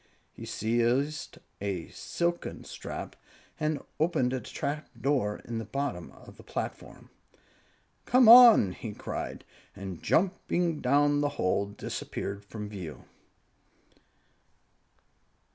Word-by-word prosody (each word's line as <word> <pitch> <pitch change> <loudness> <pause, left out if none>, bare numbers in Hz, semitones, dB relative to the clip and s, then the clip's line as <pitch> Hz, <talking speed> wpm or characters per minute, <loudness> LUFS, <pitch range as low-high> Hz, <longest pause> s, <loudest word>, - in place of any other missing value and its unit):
He - - -9
seized 120 +7 0 0.2
a 95 -4 -3
silken 175 0 -3
strap - - -7 0.4
and 155 -2 -1 0.2
opened 140 -6 +1
a 130 - -1
trap 145 +7 -4
door 125 -5 0
in 115 -1 -4
the 115 - -5
top 140 -1 -2
of 90 - -12
the - - -13
platform. - - -6 0.9
"Come 250 -2 +5
on!" 230 - +10
he 105 +3 -7
cried, - - -5 0.3
and 95 -3 -7
jumping 175 -2 +1
down 145 +2 +3
the 145 - +1
hole, 100 +2 +1
disappeared 100 0 -5
from 105 +1 -7
view. 95 -7 -8
130 Hz, 110 wpm, -29 LUFS, 105-155 Hz, 0.9 s, on